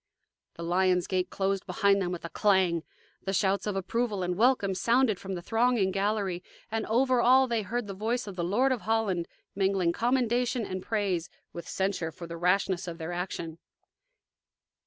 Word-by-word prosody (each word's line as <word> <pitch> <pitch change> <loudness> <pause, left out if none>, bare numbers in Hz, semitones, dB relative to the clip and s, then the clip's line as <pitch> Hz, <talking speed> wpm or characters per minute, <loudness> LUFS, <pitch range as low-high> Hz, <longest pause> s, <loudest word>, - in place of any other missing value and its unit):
The 170 - -7
lions' 180 +1 +2
gate 185 -1 -1
closed 195 0 -1
behind 200 -2 +2
them 180 -1 -1
with 175 -1 -5
a - - -5
clang; 185 -4 +2 0.4
the 195 - -3
shouts 195 +1 +1
of 205 - -1
approval 205 +1 -1
and 180 - -1
of - - -7
welcome 235 -5 +3
sounded 230 +2 +2
from 195 -1 -5
the 175 - -6
thronging 225 -2 +2
gallery, 195 -2 -1 0.3
and 225 -1 -2
over 250 +2 +3
all 260 +2 +5
they 235 -2 0
heard 235 +3 -3
the 200 - -6
voice 225 +5 -2
of 200 -3 -7
the 175 - -2
Lord 235 +10 +2
of 250 -4 -1
Holland 210 -6 0 0.3
mingling 190 -3 +1
commendation 245 +1 +1
and 185 -1 -4
praise 190 -6 -1 0.2
with 170 - -8
censure 190 -4 -1
for 170 - -9
the 170 0 -7
rashness 180 +1 +1
of 170 -1 -5
their 165 0 -5
action. 170 -2 -4
195 Hz, 180 wpm, -28 LUFS, 180-225 Hz, 0.4 s, all